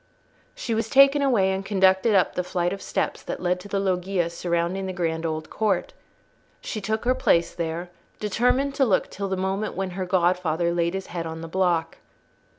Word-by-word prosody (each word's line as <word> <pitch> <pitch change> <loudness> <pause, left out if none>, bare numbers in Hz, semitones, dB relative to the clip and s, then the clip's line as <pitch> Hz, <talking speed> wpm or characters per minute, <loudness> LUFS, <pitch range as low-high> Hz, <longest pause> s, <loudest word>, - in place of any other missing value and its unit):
She 230 - -3
was 225 0 -1
taken 275 +1 +6
away 225 -9 +3
and 190 0 -2
conducted 190 +2 +3
up 190 - +3
the 180 - -1
flight 175 0 -1
of 195 - -7
steps - - -2
that - - -5
led 180 0 0
to 180 - -10
the 200 -1 -1
loggia 185 -2 0
surrounding 170 +2 -1
the 185 - -4
grand 165 -2 -1
old 155 0 -4
court. 205 -4 0 0.7
She 215 - -5
took 220 +3 -2
her 250 - +4
place 170 -9 +2
there, 170 +1 -4 0.3
determined 250 +6 +1
to 275 - +2
look 200 -6 +1
till 200 -1 -4
the 190 - -1
moment 190 +3 -2
when 190 -1 -3
her 185 0 -4
godfather 175 -2 +1
laid 170 +1 0
his 190 -1 -4
head 170 -2 -3
on 160 0 -6
the 165 - -6
block. 170 -2 0
185 Hz, 195 wpm, -24 LUFS, 170-200 Hz, 0.7 s, taken